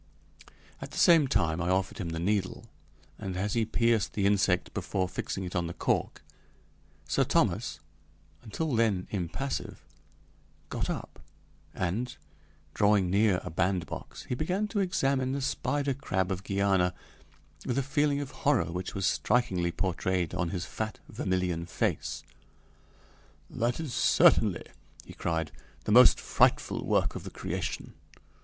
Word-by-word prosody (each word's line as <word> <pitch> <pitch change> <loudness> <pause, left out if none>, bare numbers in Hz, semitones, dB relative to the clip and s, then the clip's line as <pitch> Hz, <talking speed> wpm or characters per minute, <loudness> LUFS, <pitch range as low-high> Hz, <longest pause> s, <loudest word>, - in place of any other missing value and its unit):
At - - -6
the - - -9
same 165 -5 +6
time 85 -8 +1
I 85 - -1
offered 95 +2 0
him 90 -5 -3
the 80 - -4
needle, 95 +2 -1 0.5
and 95 -2 -4
as 100 +2 -1
he 115 -2 +1
pierced 115 -1 +1
the 100 - 0
insect 100 -3 +2
before 95 -2 -1
fixing 95 +1 -4
it 90 0 -6
on 85 -1 0
the 85 - -6
cork, - - -1 0.8
Sir - - +2
Thomas, - - +1 0.6
until 145 +7 -3
then 110 -6 +2
impassive, 105 +9 -4 0.9
got - - -3
up, - - -5 0.6
and, 115 +9 -2 0.6
drawing 100 -3 +3
near 100 -2 +3
a - - -6
bandbox, 90 0 -2
he - - -4
began 180 +10 -1
to 210 - -1
examine 135 -9 +1
the 140 - -1
spider 140 +1 -1
crab 95 -8 -1
of 95 0 -3
Guiana 95 -3 +1 0.7
with 125 - -2
a 140 - +2
feeling 145 +1 +1
of 140 0 -6
horror 125 - +1
which 90 +1 -5
was 95 -2 -1
strikingly 95 -4 +1
portrayed 90 -1 -1
on 90 -2 -1
his 90 0 -3
fat 110 +1 -4
vermilion 90 -2 -1
face. 80 - -2 1.3
"That 120 +4 -1
is 155 -6 -4
certainly," 155 - +4 0.4
he - - -11
cried, 80 -2 -2 0.3
"the - - -2
most 125 +2 +8
frightful - - +2
work - - +2
of - - -6
the - - -6
creation. - - -4
100 Hz, 145 wpm, -29 LUFS, 90-130 Hz, 1.3 s, most